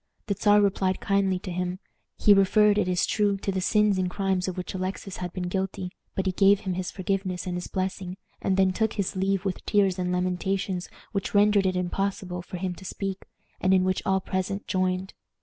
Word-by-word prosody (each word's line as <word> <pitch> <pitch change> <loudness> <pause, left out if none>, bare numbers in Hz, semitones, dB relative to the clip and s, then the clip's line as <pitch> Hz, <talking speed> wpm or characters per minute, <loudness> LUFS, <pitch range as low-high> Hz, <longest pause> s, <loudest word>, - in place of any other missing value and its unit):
The 200 - 0
Czar 205 +1 +4
replied 190 -2 +1
kindly 195 -2 +1
to 185 0 -6
him. 180 +1 -2 0.4
He 205 - +6
referred, 205 +1 +4
it 210 - +1
is 180 0 +2
true, 205 -2 +1
to 195 - -2
the 190 -1 -1
sins 210 0 +3
and 185 -1 0
crimes 190 -1 0
of 185 - -4
which 180 - -4
Alexis 190 +1 -4
had 180 -1 -4
been 180 -1 -4
guilty, 190 0 -3 0.2
but 190 - -1
he 190 - +2
gave 195 +1 +4
him 190 -2 -2
his 180 0 -3
forgiveness 190 -1 -2
and 180 - -3
his 180 0 -4
blessing, 185 -1 -3 0.2
and 190 - +1
then 190 -1 +4
took 220 +2 0
his 200 -3 -2
leave 195 0 0
with 190 - -2
tears 195 -3 +2
and 180 0 -1
lamentations 185 +1 -1 0.2
which 195 -1 -3
rendered 205 -1 +5
it 185 - 0
impossible 180 0 -2
for 180 - -7
him 180 0 -2
to - - -12
speak, 195 0 -5 0.3
and 185 +1 +3
in 185 - +4
which 185 0 0
all 190 0 +2
present 190 +2 -3
joined. 185 0 -1
190 Hz, 210 wpm, -26 LUFS, 185-195 Hz, 0.4 s, He